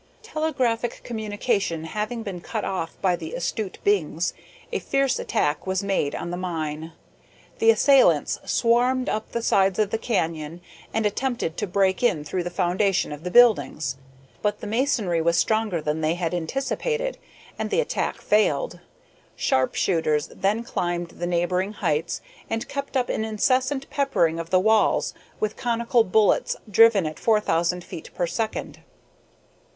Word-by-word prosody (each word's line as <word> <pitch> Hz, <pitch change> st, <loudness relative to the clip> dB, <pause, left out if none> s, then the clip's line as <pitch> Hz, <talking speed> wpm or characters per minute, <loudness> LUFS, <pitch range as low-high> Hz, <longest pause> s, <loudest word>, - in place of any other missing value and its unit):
Telegraphic 260 Hz, -, -1 dB
communication 210 Hz, -6 st, -1 dB
having 215 Hz, +7 st, -3 dB
been 190 Hz, -5 st, -6 dB
cut 220 Hz, +3 st, -4 dB
off 170 Hz, -3 st, -4 dB
by 185 Hz, -2 st, +3 dB
the 165 Hz, -2 st, -7 dB
astute 190 Hz, +3 st, -3 dB
Bings, 170 Hz, -4 st, +1 dB, 0.4 s
a -, -, -1 dB
fierce 275 Hz, -1 st, +1 dB
attack 150 Hz, +4 st, -1 dB
was 190 Hz, +1 st, 0 dB
made 195 Hz, -8 st, 0 dB
on 170 Hz, -, -4 dB
the 175 Hz, -, -3 dB
mine. 160 Hz, -3 st, -4 dB, 0.7 s
The 225 Hz, -, +4 dB
assailants 225 Hz, -, +4 dB
swarmed 250 Hz, +2 st, +2 dB
up 215 Hz, 0 st, -3 dB
the 235 Hz, -, -2 dB
sides 195 Hz, -4 st, +3 dB
of 210 Hz, -2 st, +1 dB
the 225 Hz, -, -1 dB
canyon, 165 Hz, -7 st, -2 dB, 0.3 s
and 220 Hz, 0 st, 0 dB
attempted 220 Hz, -5 st, -1 dB
to 210 Hz, -, -2 dB
break 190 Hz, 0 st, +1 dB
in 180 Hz, -12 st, +2 dB
through 180 Hz, +5 st, -2 dB
the 175 Hz, -, -3 dB
foundation 185 Hz, 0 st, +1 dB
of 150 Hz, +1 st, -7 dB
the 180 Hz, -, -3 dB
buildings. 215 Hz, -, +4 dB, 0.5 s
But 210 Hz, 0 st, 0 dB
the -, -, -7 dB
masonry 215 Hz, -, +1 dB
was 170 Hz, +1 st, +2 dB
stronger 215 Hz, -4 st, +1 dB
than 150 Hz, +1 st, -2 dB
they 155 Hz, +2 st, +1 dB
had 175 Hz, -1 st, -2 dB
anticipated, 275 Hz, -, -2 dB, 0.4 s
and -, -, -2 dB
the 430 Hz, -, +1 dB
attack -, -, -1 dB
failed. 210 Hz, -9 st, +1 dB, 0.6 s
Sharp 130 Hz, 0 st, +1 dB
shooters 155 Hz, -4 st, +1 dB
then 205 Hz, +4 st, 0 dB
climbed 175 Hz, -6 st, -2 dB
the 175 Hz, -, -5 dB
neighboring 180 Hz, +3 st, 0 dB
heights, 150 Hz, -, -1 dB, 0.3 s
and 225 Hz, +1 st, -2 dB
kept 280 Hz, -1 st, -3 dB
up 250 Hz, -1 st, 0 dB
an -, -, -1 dB
incessant 255 Hz, +5 st, 0 dB
peppering 170 Hz, -, +1 dB
of 165 Hz, 0 st, -5 dB
the 185 Hz, -, +4 dB
walls 220 Hz, +2 st, +3 dB, 0.3 s
with 215 Hz, 0 st, -1 dB
conical 235 Hz, -1 st, +1 dB
bullets 210 Hz, +1 st, +2 dB
driven 210 Hz, -2 st, +5 dB
at 155 Hz, 0 st, -5 dB
four 220 Hz, -2 st, +3 dB
thousand 180 Hz, -2 st, 0 dB
feet 160 Hz, -, -9 dB
per 175 Hz, -, 0 dB
second. 220 Hz, +5 st, -3 dB
200 Hz, 155 wpm, -24 LUFS, 170-230 Hz, 0.7 s, driven